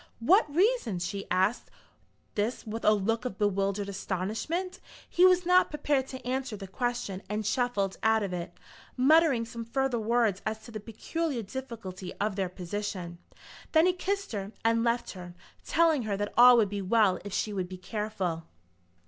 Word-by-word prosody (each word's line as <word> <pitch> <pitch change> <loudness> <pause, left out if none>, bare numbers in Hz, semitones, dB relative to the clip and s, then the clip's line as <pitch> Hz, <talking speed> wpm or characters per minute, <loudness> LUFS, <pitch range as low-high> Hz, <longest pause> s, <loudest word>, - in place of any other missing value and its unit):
"What 340 - +4
reasons?" 325 - +1
She 200 +1 -5
asked 190 +6 +1 0.6
this 215 +5 -2
with 225 +1 -5
a - - +6
look 220 +3 0
of 250 -6 -4
bewildered 200 0 0
astonishment. 210 - -3 0.3
He 360 +1 +5
was 365 -1 +3
not 360 +1 +5
prepared 290 -3 0
to 260 -2 -9
answer 255 -3 -2
the 195 - -7
question, 200 -2 -3
and 210 +1 -2
shuffled 210 -4 0
out 220 -1 +3
of 195 -2 -3
it, 175 -1 -6 0.4
muttering 275 -2 +4
some 230 0 -7
further 255 +1 -1
words 220 -3 +1
as 220 0 -4
to 235 - -11
the 215 - -5
peculiar 245 +5 -3
difficulty 200 -6 -7
of 205 -1 -1
their 190 -2 -1
position. 180 -1 -5 0.5
Then 320 +1 +6
he 365 - +3
kissed 395 +2 -2
her 200 -2 -4
and 230 0 +3
left 235 0 0
her, 180 -2 -10 0.3
telling 325 -4 +3
her 210 -3 -2
that 205 0 -3
all 245 +1 +8
would 215 -4 +3
be 205 0 -3
well 200 -1 +3
if 205 - -7
she 210 +2 -1
would 185 -2 -3
be 185 - -7
careful. 185 -4 -3
220 Hz, 175 wpm, -29 LUFS, 195-260 Hz, 0.6 s, all